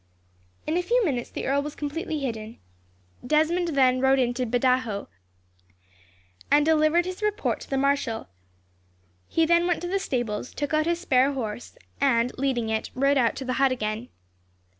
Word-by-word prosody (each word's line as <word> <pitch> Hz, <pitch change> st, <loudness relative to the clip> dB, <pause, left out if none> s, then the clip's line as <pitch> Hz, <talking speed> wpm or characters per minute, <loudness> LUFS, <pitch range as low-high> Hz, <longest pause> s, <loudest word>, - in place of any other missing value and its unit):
In 310 Hz, +3 st, 0 dB
a -, -, +2 dB
few 470 Hz, +5 st, +2 dB
minutes, 250 Hz, -7 st, -2 dB
the -, -, -5 dB
earl 280 Hz, +1 st, +1 dB
was 295 Hz, +1 st, -6 dB
completely 305 Hz, +1 st, -4 dB
hidden. 225 Hz, -4 st, -5 dB, 0.7 s
Desmond 315 Hz, +6 st, +2 dB
then 255 Hz, -2 st, +4 dB
rode 265 Hz, 0 st, +4 dB
into 250 Hz, -1 st, 0 dB
Badajos, 245 Hz, -3 st, +1 dB, 1.4 s
and 290 Hz, +1 st, +4 dB
delivered 320 Hz, +2 st, +3 dB
his 370 Hz, +2 st, -6 dB
report 425 Hz, +1 st, -1 dB
to -, -, -12 dB
the 270 Hz, -, 0 dB
marshal. 270 Hz, -5 st, 0 dB, 1.0 s
He 325 Hz, -, +2 dB
then 340 Hz, +1 st, +3 dB
went 350 Hz, -2 st, +1 dB
to -, -, -2 dB
the 390 Hz, +2 st, 0 dB
stables, 240 Hz, -, -3 dB
took 290 Hz, +1 st, -3 dB
out 310 Hz, +1 st, +2 dB
his 340 Hz, 0 st, 0 dB
spare 275 Hz, -5 st, +2 dB
horse, 235 Hz, -3 st, -5 dB, 0.2 s
and, 250 Hz, -3 st, +2 dB
leading 250 Hz, -5 st, 0 dB
it, 220 Hz, 0 st, -2 dB
rode 275 Hz, +2 st, +3 dB
out 235 Hz, -2 st, +2 dB
to 265 Hz, -, -6 dB
the 255 Hz, -, -1 dB
hut 270 Hz, -1 st, +4 dB
again. 220 Hz, 0 st, -3 dB
275 Hz, 165 wpm, -25 LUFS, 245-320 Hz, 1.4 s, then